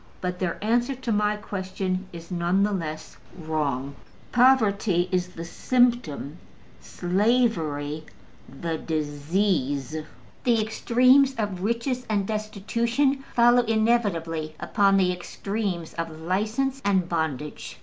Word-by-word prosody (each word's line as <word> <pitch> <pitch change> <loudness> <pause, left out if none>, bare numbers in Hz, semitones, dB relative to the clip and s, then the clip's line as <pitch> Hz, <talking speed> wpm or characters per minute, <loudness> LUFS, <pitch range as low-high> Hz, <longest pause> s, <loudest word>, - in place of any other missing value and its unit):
But 180 0 -3
their 175 -3 -1
answer 240 +5 +1
to 255 -2 -4
my 210 0 +2
question 190 -2 -3
is 170 +1 -10
none 175 +2 +1
the 210 - +1
less 155 -5 -5 0.2
wrong. 145 -5 -2 0.4
Poverty 215 -8 +4
is 180 -1 +1
the 165 - -6
symptom: 235 - 0 0.4
slavery 165 - 0 0.4
the 160 +4 -4
disease. 150 -2 -1 0.5
The 235 -2 +3
extremes 255 +5 +4
of 205 -6 -3
riches 235 +4 -1
and 205 -2 +1
destitution 230 +6 0
follow 240 +1 +6
inevitably 205 -9 0
upon 200 -2 +3
the 185 -2 +3
extremes 180 -1 -4
of 165 0 -3
license 220 +10 -1
and 190 -3 +2
bondage. 155 -4 -3
195 Hz, 110 wpm, -25 LUFS, 165-230 Hz, 0.5 s, follow